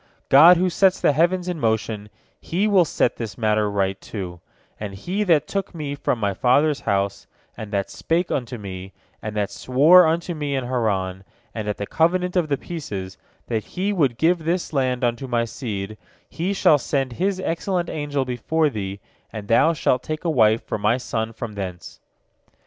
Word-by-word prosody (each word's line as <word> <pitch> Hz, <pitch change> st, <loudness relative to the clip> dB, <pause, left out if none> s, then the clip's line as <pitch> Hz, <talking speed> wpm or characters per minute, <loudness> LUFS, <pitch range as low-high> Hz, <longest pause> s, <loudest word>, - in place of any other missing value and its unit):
God 165 Hz, +6 st, +8 dB
who 185 Hz, +2 st, +2 dB
sets 190 Hz, +1 st, +3 dB
the -, -, +3 dB
heavens 175 Hz, +4 st, +1 dB
in 175 Hz, -3 st, -3 dB
motion, 110 Hz, -3 st, -1 dB, 0.3 s
He 190 Hz, +5 st, -1 dB
will 195 Hz, -4 st, +4 dB
set 125 Hz, -, 0 dB
this 115 Hz, -3 st, -6 dB
matter 110 Hz, -2 st, +1 dB
right, 95 Hz, -1 st, -1 dB
too, 90 Hz, -5 st, -7 dB, 0.4 s
and 105 Hz, -2 st, -6 dB
He 185 Hz, -, -2 dB
that 165 Hz, -5 st, +3 dB
took 195 Hz, -2 st, -3 dB
me 150 Hz, -3 st, -4 dB
from 140 Hz, -3 st, -1 dB
my 100 Hz, -3 st, -1 dB
father's 140 Hz, +7 st, +2 dB
house, 100 Hz, 0 st, -1 dB, 0.3 s
and 110 Hz, -2 st, -8 dB
that 100 Hz, -2 st, -2 dB
spake 170 Hz, +2 st, -1 dB
unto 125 Hz, -1 st, -2 dB
me, 95 Hz, -2 st, -8 dB, 0.3 s
and 105 Hz, 0 st, -5 dB
that 105 Hz, -2 st, -1 dB
swore 160 Hz, +7 st, +5 dB
unto 170 Hz, +2 st, -1 dB
me 145 Hz, -3 st, -3 dB
in 135 Hz, -, -1 dB
Haran, 100 Hz, -7 st, -1 dB, 0.3 s
and 110 Hz, -2 st, -5 dB
at 105 Hz, -, -2 dB
the 100 Hz, -, -3 dB
covenant 180 Hz, -, +1 dB
of 175 Hz, -3 st, +2 dB
the 140 Hz, -, +1 dB
pieces, 100 Hz, -, -6 dB, 0.3 s
that 110 Hz, -3 st, -2 dB
He 195 Hz, +3 st, -2 dB
would 140 Hz, -, +1 dB
give 170 Hz, +5 st, +3 dB
this 170 Hz, +1 st, -2 dB
land 130 Hz, -2 st, 0 dB
unto 120 Hz, +2 st, -1 dB
my 120 Hz, -1 st, 0 dB
seed, 110 Hz, -3 st, -5 dB, 0.3 s
He 175 Hz, +4 st, -3 dB
shall 160 Hz, -6 st, +4 dB
send 135 Hz, -2 st, -1 dB
His 185 Hz, +7 st, -1 dB
excellent 175 Hz, 0 st, -1 dB
angel 145 Hz, -3 st, -2 dB
before 145 Hz, +5 st, 0 dB
thee, 100 Hz, -3 st, -5 dB, 0.3 s
and 105 Hz, -2 st, -7 dB
thou 115 Hz, +9 st, +4 dB
shalt 130 Hz, -5 st, +1 dB
take 155 Hz, +5 st, -5 dB
a 165 Hz, -, +2 dB
wife 110 Hz, -6 st, +3 dB
for -, -, -4 dB
my 110 Hz, +4 st, +2 dB
son 115 Hz, -3 st, -3 dB
from 115 Hz, -1 st, -7 dB
thence." 90 Hz, -3 st, -7 dB
130 Hz, 185 wpm, -22 LUFS, 105-165 Hz, 0.4 s, God